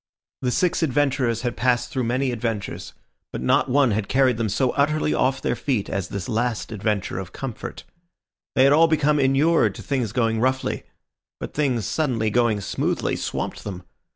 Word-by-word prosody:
The 125 Hz, -, 0 dB
six 180 Hz, +8 st, +1 dB
adventurers 135 Hz, -5 st, +1 dB
had 120 Hz, -, -1 dB
passed 125 Hz, -1 st, +1 dB
through 130 Hz, -3 st, -1 dB
many 130 Hz, +3 st, 0 dB
adventures, 115 Hz, -3 st, -4 dB, 0.4 s
but -, -, -4 dB
not 65 Hz, -, +2 dB
one 135 Hz, -2 st, +3 dB
had 105 Hz, -1 st, -1 dB
carried 130 Hz, -3 st, +3 dB
them 115 Hz, -2 st, -1 dB
so 130 Hz, +5 st, +1 dB
utterly 150 Hz, +2 st, +1 dB
off 135 Hz, +1 st, +1 dB
their -, -, 0 dB
feet 120 Hz, -3 st, -2 dB
as 95 Hz, -2 st, -2 dB
this 100 Hz, -1 st, -5 dB
last 115 Hz, -1 st, -1 dB
adventure 105 Hz, -3 st, -2 dB
of 95 Hz, -2 st, -8 dB
comfort. 130 Hz, -5 st, -6 dB, 0.7 s
They 130 Hz, -, +5 dB
had 140 Hz, +1 st, +6 dB
all 165 Hz, +2 st, +6 dB
become 150 Hz, -2 st, +2 dB
inured 140 Hz, +5 st, +3 dB
to -, -, -9 dB
things 125 Hz, -7 st, -1 dB
going 115 Hz, -1 st, +1 dB
roughly; 130 Hz, +2 st, 0 dB, 0.5 s
but -, -, -6 dB
things 130 Hz, -8 st, 0 dB
suddenly 115 Hz, -, 0 dB
going 115 Hz, -3 st, +2 dB
smoothly -, -, -1 dB
swamped -, -, -4 dB
them. 95 Hz, -3 st, -6 dB
125 Hz, 175 wpm, -23 LUFS, 110-135 Hz, 0.7 s, had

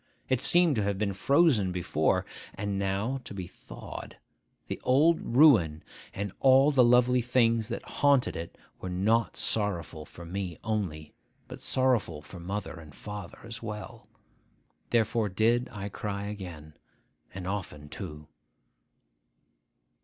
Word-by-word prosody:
It 130 Hz, -2 st, +1 dB
seemed 175 Hz, -4 st, +4 dB
to -, -, +2 dB
have 100 Hz, -1 st, -1 dB
been 100 Hz, -1 st, -1 dB
frozen 130 Hz, -, +3 dB
before, 90 Hz, -1 st, 0 dB, 0.3 s
and 100 Hz, -1 st, -2 dB
now 100 Hz, +7 st, -1 dB
to 100 Hz, -, -9 dB
be 95 Hz, -2 st, -4 dB
thawed. -, -, -10 dB, 0.5 s
The -, -, -5 dB
old 155 Hz, +6 st, +4 dB
ruin 115 Hz, -, +5 dB, 0.3 s
and 100 Hz, 0 st, -4 dB
all 135 Hz, +2 st, +6 dB
the 130 Hz, -3 st, +5 dB
lovely 125 Hz, +1 st, +4 dB
things 115 Hz, -2 st, +2 dB
that -, -, -4 dB
haunted 140 Hz, -3 st, +2 dB
it 85 Hz, 0 st, -7 dB, 0.2 s
were 95 Hz, -, -5 dB
not 105 Hz, +6 st, +1 dB
sorrowful 85 Hz, -7 st, -1 dB
for 85 Hz, -, -11 dB
me 90 Hz, -1 st, -4 dB
only, 95 Hz, -9 st, -3 dB, 0.3 s
but -, -, -9 dB
sorrowful 120 Hz, -, +1 dB
for 90 Hz, -, -10 dB
mother 95 Hz, 0 st, -5 dB
and 75 Hz, -4 st, -13 dB
father 105 Hz, -4 st, -8 dB
as 115 Hz, -1 st, -7 dB
well. 105 Hz, -2 st, -7 dB, 0.8 s
Therefore 115 Hz, -2 st, +1 dB
did 115 Hz, +6 st, +2 dB
I 105 Hz, -3 st, -5 dB
cry 100 Hz, 0 st, -4 dB
again, 90 Hz, -7 st, -7 dB, 0.6 s
and 95 Hz, -1 st, -7 dB
often 90 Hz, -7 st, -5 dB
too. 75 Hz, +1 st, -8 dB
105 Hz, 135 wpm, -29 LUFS, 90-120 Hz, 0.8 s, all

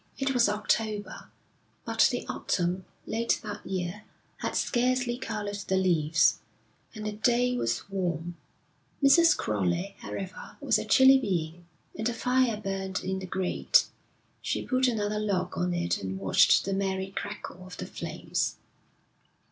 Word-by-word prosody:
It 270 Hz, 0 st, 0 dB
was 240 Hz, -4 st, +4 dB
October, 210 Hz, 0 st, -2 dB, 0.6 s
but -, -, +4 dB
the -, -, -3 dB
autumn, 180 Hz, +1 st, -1 dB, 0.2 s
late 230 Hz, +1 st, 0 dB
that 210 Hz, -1 st, -6 dB
year, 185 Hz, +2 st, -4 dB, 0.3 s
had -, -, -3 dB
scarcely 250 Hz, 0 st, +1 dB
coloured 210 Hz, -4 st, -4 dB
the 190 Hz, -, +1 dB
leaves, 160 Hz, -5 st, +3 dB, 0.6 s
and 215 Hz, 0 st, -6 dB
the 210 Hz, -, -1 dB
day 245 Hz, +4 st, +2 dB
was 115 Hz, -, -1 dB
warm. 175 Hz, -3 st, -3 dB, 0.7 s
Mrs. 330 Hz, +5 st, +6 dB
Crowley, 105 Hz, -, -1 dB
however, 190 Hz, -1 st, -7 dB
was -, -, +2 dB
a -, -, -4 dB
chilly 265 Hz, 0 st, +7 dB
being, 175 Hz, -6 st, -3 dB, 0.3 s
and 220 Hz, +2 st, -1 dB
a 235 Hz, -, -3 dB
fire 250 Hz, -2 st, +2 dB
burned 195 Hz, -2 st, -3 dB
in 190 Hz, +1 st, -2 dB
the 190 Hz, -, -7 dB
grate. 190 Hz, -, +2 dB, 0.6 s
She -, -, -2 dB
put 255 Hz, 0 st, +2 dB
another 210 Hz, -3 st, 0 dB
log 190 Hz, -4 st, -1 dB
on 180 Hz, 0 st, 0 dB
it 175 Hz, -1 st, -1 dB
and 95 Hz, 0 st, -4 dB
watched 95 Hz, -1 st, +4 dB
the 195 Hz, -, -1 dB
merry 190 Hz, 0 st, -1 dB
crackle 200 Hz, -2 st, -6 dB
of 185 Hz, -, -10 dB
the -, -, -5 dB
flames. -, -, -3 dB
195 Hz, 145 wpm, -28 LUFS, 180-230 Hz, 0.7 s, chilly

